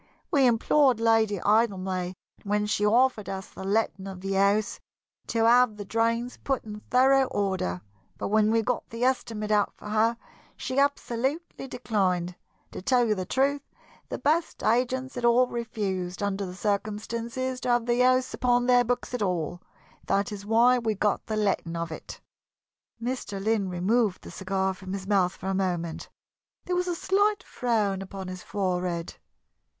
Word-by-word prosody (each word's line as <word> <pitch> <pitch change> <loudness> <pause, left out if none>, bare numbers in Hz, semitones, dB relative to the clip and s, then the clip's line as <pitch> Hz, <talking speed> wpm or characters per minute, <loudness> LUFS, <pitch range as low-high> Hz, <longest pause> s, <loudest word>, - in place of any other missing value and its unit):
"We 275 -3 +5
implored 245 +2 +3
Lady 225 -2 +3
Idlemay, 190 -3 +1 0.3
when 210 +1 0
she 210 0 0
offered 225 -2 +3
us 190 0 -5
the - - -9
letting 200 -1 0
of 190 -2 -8
the 195 +1 -2
house, 200 +2 +2 0.5
to 225 -1 +1
have 240 -2 +5
the 205 - -6
drains 230 +3 0
put 270 -3 -2
in 210 -1 -8
thorough 265 +2 +5
order, 190 - -2 0.4
but - - -3
when 215 0 +3
we 225 0 +2
got 250 +1 -2
the 230 +2 -4
estimate 225 -4 0
out 210 -1 +3
for 210 - -10
her 225 +2 +2 0.4
she 260 +1 -2
absolutely 280 +2 -1
declined. 185 -8 -1 0.4
To - - -7
tell 245 +4 +3
you 215 - +2
the 185 -3 -4
truth, 280 +2 +1 0.5
the - - -3
best 320 +3 0
agents 255 +3 +1
had 245 - -5
all 240 +1 +5
refused, 200 -6 -3
under 200 -1 -1
the 180 - -8
circumstances, 230 +5 -2
to - - -2
have 240 -1 +2
the 240 0 +1
house 255 0 +3
upon 245 -1 +2
their 245 -1 +5
books 245 +1 -2
at 250 - -2
all. 175 -3 -1 0.5
That 200 +1 +1
is 205 -1 -7
why 240 +3 +5
we 220 -2 -1
got 205 +1 0
the 215 - -2
letting 195 -5 0
of 170 0 -3
it." 160 - -8 0.8
Mr. 235 -4 -4
Lynn 205 -1 0
removed 195 +3 +1
the - - -9
cigar 190 0 -1
from 190 0 -8
his 195 -1 -5
mouth 190 -2 +2
for - - -11
a 195 - 0
moment. 175 -4 -2 0.6
There 360 - -1
was 360 0 0
a 350 - -1
slight 405 +4 +1
frown 210 -6 -1
Upon 195 -1 -7
his 185 0 -7
forehead. 180 -3 -2
215 Hz, 170 wpm, -27 LUFS, 195-245 Hz, 0.8 s, We